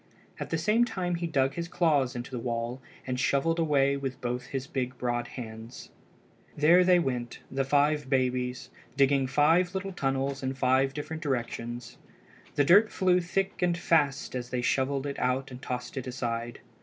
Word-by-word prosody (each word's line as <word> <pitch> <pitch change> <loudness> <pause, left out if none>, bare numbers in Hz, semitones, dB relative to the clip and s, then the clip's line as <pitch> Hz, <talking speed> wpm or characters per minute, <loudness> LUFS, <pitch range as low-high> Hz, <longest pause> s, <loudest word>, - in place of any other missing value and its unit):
At - - -5
the 165 - 0
same 210 +8 +3
time 185 -6 -2
he 170 0 -2
dug 135 -4 +1
his 170 0 -4
claws 145 -8 +1
into 120 +2 -6
the 125 - -3
wall 120 +2 -3 0.2
and 125 -1 -2
shovelled 165 +6 +1
away 140 -4 +3
with 135 -2 -4
both 125 +1 -3
his 135 -1 -4
big 130 -4 -3
broad 120 -1 -1
hands. 115 -1 -9 0.7
There 165 +5 +6
they 180 0 +5
went—the 130 -2 -2
five 145 0 +2
babies—digging 130 +1 0
five 165 +7 +3
little 195 0 -3
tunnels 135 -3 -1
in 130 0 -2
five 130 +1 +2
different 160 +2 -5
directions. 120 -4 -4 0.6
The 145 - +4
dirt 200 +9 +6
flew 180 -1 +2
thick 190 +2 -2
and 175 -1 +2
fast 160 -6 +1
as 125 -1 -4
they 125 -1 -2
shovelled 135 +2 0
it 140 -1 -4
out 130 +1 0
and 125 0 -9
tossed 125 -1 -5
it 130 - -4
aside. 120 -2 -4
135 Hz, 170 wpm, -28 LUFS, 125-160 Hz, 0.7 s, There